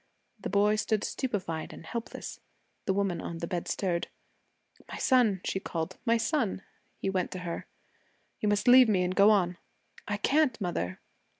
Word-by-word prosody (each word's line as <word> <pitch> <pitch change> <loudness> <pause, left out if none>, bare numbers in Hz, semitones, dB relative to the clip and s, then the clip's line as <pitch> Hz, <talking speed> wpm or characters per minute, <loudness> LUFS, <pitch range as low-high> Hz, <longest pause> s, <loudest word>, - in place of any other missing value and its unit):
The - - -4
boy 210 +1 +3
stood 215 0 0
stupefied 190 - -3
and - - -11
helpless. 230 +7 -6 0.5
The 190 - +2
woman 195 -3 0
on 170 - -5
the 170 - -3
bed 175 0 -3
stirred. 175 -3 -1 0.8
'My - - -7
son,' 230 -8 +3
she 190 - -1
called. 165 -4 -4
'My 230 -1 +4
son.' 225 - 0 0.3
He 195 - -2
went 185 -2 0
to 185 - -5
her. 170 - -4 0.7
'You 210 - +1
must 205 +2 +1
leave 250 -1 +8
me 190 -4 +3
and 180 0 0
go 200 +1 +7
on.' 180 -4 +3 0.5
'I 205 - -1
can't, 275 +2 +2
mother.' 170 - -2
200 Hz, 170 wpm, -29 LUFS, 180-225 Hz, 0.8 s, leave